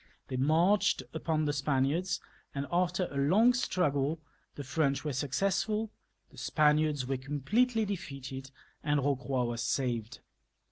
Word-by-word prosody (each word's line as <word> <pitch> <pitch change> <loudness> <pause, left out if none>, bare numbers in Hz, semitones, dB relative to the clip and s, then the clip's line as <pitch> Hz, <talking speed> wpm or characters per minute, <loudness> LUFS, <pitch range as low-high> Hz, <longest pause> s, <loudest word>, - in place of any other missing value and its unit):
They 130 - -3
marched 160 +5 +3
upon 160 -1 0
the 145 - 0
Spaniards, 145 +6 0 0.4
and 140 0 -2
after 175 +1 +1
a 140 - -5
long 195 - +5
struggle 155 - 0 0.4
the 145 - -6
French 140 +1 0
were 150 - -1
successful, 195 - 0 0.4
the - - -12
Spaniards 150 -2 +2
were 135 +1 -1
completely 210 - +1
defeated, 135 -8 -6 0.3
and 145 0 +2
Eocroy 135 -2 0
was 120 -1 -3
saved. 120 -3 -2
145 Hz, 130 wpm, -31 LUFS, 135-180 Hz, 0.4 s, long